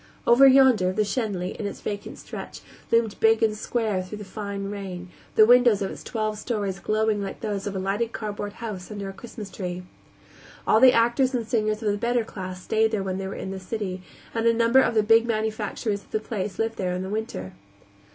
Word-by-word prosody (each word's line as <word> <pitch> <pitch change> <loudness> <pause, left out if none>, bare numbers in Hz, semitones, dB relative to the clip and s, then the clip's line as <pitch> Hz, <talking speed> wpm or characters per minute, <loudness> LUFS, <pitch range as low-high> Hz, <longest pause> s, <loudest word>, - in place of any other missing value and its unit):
Over 250 +3 +7
yonder, 260 -8 +5
the 215 +3 +1
Schenley, 200 -5 -2
in 205 - -2
its - - -7
vacant 205 -1 -5
stretch, - - -8 0.3
loomed 230 -2 +2
big 225 0 +4
and 215 -1 +2
square 215 -3 -1
through 185 +3 -7
the 210 - -8
fine 200 0 -5
rain, 185 -3 -6 0.3
the 215 - +8
windows 240 -3 +5
of 190 - -3
its - - -9
twelve 215 -2 -2
stories 205 -5 -2
glowing 215 0 +1
like 195 - -6
those 205 -2 -3
of 200 - -4
a - - -1
lighted 200 +5 -1
cardboard 205 -2 -5
house 210 -5 -7
under 200 -2 -5
a - - -7
Christmas 215 -1 -9
tree. 180 -2 -5 0.8
All 220 - +5
the 260 +1 +8
actors 250 +3 +2
and 230 -3 -2
singers 215 -2 0
of 210 - +2
the 205 - -2
better 240 +1 +1
class 185 -4 -7
stayed 220 0 +2
there 215 -3 -1
when 190 0 -3
they 190 - -3
were 195 - -5
in 190 - -5
the 195 - -5
city, 190 -1 -4 0.3
and 230 0 +1
a 230 - +5
number 230 +3 +5
of 235 -3 +2
the 215 - +4
big 225 +2 +5
manufacturers 215 -1 -2
of - - -24
the 215 - -1
place 205 -3 -4
lived 225 0 -1
there 180 -2 -1
in 180 - -3
the - - -5
winter. 200 - -4
215 Hz, 220 wpm, -25 LUFS, 195-225 Hz, 0.8 s, the